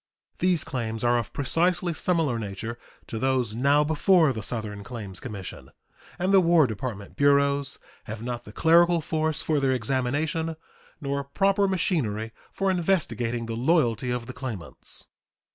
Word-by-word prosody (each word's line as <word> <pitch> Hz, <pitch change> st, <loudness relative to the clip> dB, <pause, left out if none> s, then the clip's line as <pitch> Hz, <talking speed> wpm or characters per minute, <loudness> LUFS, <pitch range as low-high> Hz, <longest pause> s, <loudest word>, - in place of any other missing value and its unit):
These 180 Hz, -3 st, +2 dB
claims 115 Hz, -4 st, -4 dB
are 120 Hz, 0 st, +3 dB
of 115 Hz, -, -5 dB
precisely 175 Hz, +5 st, +1 dB
similar 160 Hz, -8 st, +1 dB
nature 110 Hz, +3 st, -5 dB, 0.3 s
to 115 Hz, -, -5 dB
those 130 Hz, -3 st, +1 dB
now 140 Hz, +5 st, +3 dB
before 160 Hz, 0 st, +4 dB
the 110 Hz, -, -5 dB
Southern 105 Hz, -1 st, -5 dB
Claims 100 Hz, -4 st, -7 dB
Commission, 105 Hz, -8 st, -8 dB, 0.5 s
and 185 Hz, +2 st, +1 dB
the 195 Hz, -, +8 dB
War 170 Hz, -3 st, +5 dB
Department 110 Hz, -3 st, -5 dB
bureaus 140 Hz, 0 st, +2 dB, 0.3 s
have 110 Hz, 0 st, -6 dB
not 120 Hz, 0 st, -4 dB
the 105 Hz, -, -11 dB
clerical 170 Hz, +5 st, +5 dB
force 155 Hz, 0 st, -1 dB
for 155 Hz, -2 st, +1 dB
their 135 Hz, -1 st, +2 dB
examination 145 Hz, +7 st, -1 dB, 0.4 s
nor 140 Hz, -1 st, -2 dB
proper 195 Hz, +7 st, +2 dB
machinery 120 Hz, -, 0 dB, 0.2 s
for 195 Hz, -1 st, 0 dB
investigating 155 Hz, -10 st, 0 dB
the 115 Hz, -, -4 dB
loyalty 125 Hz, -2 st, +2 dB
of 125 Hz, -1 st, -2 dB
the 130 Hz, -, -7 dB
claimants. 125 Hz, -9 st, -6 dB
135 Hz, 145 wpm, -26 LUFS, 115-160 Hz, 0.5 s, the